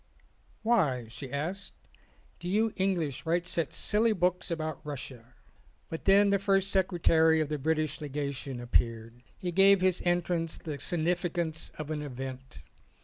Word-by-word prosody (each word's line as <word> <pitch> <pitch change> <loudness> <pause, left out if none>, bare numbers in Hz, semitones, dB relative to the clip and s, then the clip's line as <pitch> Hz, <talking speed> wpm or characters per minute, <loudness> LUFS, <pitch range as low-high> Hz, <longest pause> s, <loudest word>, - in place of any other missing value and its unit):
"Why," 155 - +2
she 115 +4 -9
asked, 175 +8 -4 0.6
"do 175 - -6
you 215 +4 +1
English 175 -9 -1
write 170 +1 0
such 165 -4 -1
silly 220 +2 +2
books 180 -1 0
about 155 -3 -3
Russia?" 130 -5 -8 0.5
But 160 - -6
then 200 +1 +6
the 200 - +3
first 195 0 +2
secretary 165 -4 +3
of 155 -2 0
the 150 -1 -2
British 155 0 0
Lega 145 -1 -3
tion 130 -1 -6
appeared. 115 -1 -1 0.2
He 180 - -3
gave 195 +2 +6
his 185 -1 +2
entrance 175 -2 0
the 150 -4 -6
signifi 175 +4 0
cance 160 -2 -2
of 155 0 -5
an 150 -1 -2
event. 130 -2 -7
160 Hz, 150 wpm, -29 LUFS, 140-185 Hz, 0.6 s, then